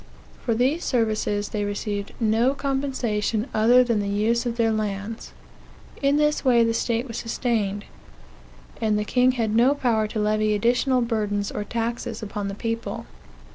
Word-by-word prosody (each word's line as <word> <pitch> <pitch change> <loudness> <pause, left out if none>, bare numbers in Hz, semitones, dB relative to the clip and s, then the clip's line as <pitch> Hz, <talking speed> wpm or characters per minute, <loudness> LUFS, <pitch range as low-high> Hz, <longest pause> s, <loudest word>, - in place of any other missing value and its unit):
For 230 - 0
these 265 +9 +1
services 215 -4 0
they 210 -1 -2
received 205 0 -3
no 230 +4 +2
compensation 260 -6 -1
other 240 +4 +5
than 235 -3 0
the 200 - -2
use 225 +4 +1
of 235 -1 -3
their 225 -1 +2
lands. 215 0 -3 0.7
In 280 +1 +3
this 300 0 +2
way 245 -3 +5
the 230 0 +1
state 230 +2 -1
was 230 - -6
sustained; 220 -4 -1 1.0
and 215 -2 +2
the 210 - -1
king 250 +3 +3
had 225 -4 -1
no 245 +5 +4
power 230 -6 +1
to 215 - -6
levy 215 0 +1
additional 245 +4 +2
burdens 210 -3 -1
or 210 - -3
taxes 235 +1 -3
upon 205 -1 -4
the 195 - -4
people. 230 +1 -4
225 Hz, 160 wpm, -24 LUFS, 210-245 Hz, 1.0 s, other